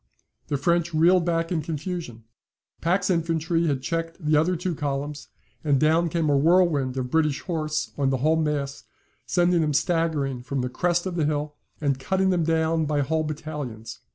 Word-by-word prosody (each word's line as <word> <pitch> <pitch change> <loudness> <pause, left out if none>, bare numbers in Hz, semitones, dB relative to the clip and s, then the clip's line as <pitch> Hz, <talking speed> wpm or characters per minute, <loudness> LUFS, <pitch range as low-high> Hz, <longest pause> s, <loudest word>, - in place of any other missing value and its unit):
The 145 - -1
French 170 +3 +1
reeled 170 +2 +4
back 165 0 0
in 165 -3 0
confusion. 155 -6 -5 0.6
Pack's 185 +3 +1
infantry 165 0 0
had 135 -3 -1
checked 165 +1 -3
the 155 -2 +1
other 165 +5 +3
two 180 +1 -2
columns 145 0 -4 0.4
and 145 -3 +2
down 160 +3 +3
came 165 0 0
a 145 - +3
whirlwind 150 -4 +3
of 125 -1 -3
British 155 -3 +1
horse 155 -3 -2
on 135 -1 +2
the 135 - +1
whole 155 +5 +2
mass, 145 -3 -2 0.4
sending 175 -1 +3
them 150 -1 0
staggering 150 -5 0
from 130 +1 -3
the 125 - -2
crest 175 +6 0
of 180 -2 -3
the 155 - +2
hill, 150 0 -1 0.3
and 140 -3 0
cutting 190 +7 +1
them 175 -2 +1
down 160 -1 +1
by 145 -1 +1
whole 155 +3 0
battalions. 150 -7 -6
155 Hz, 180 wpm, -25 LUFS, 145-170 Hz, 0.6 s, reeled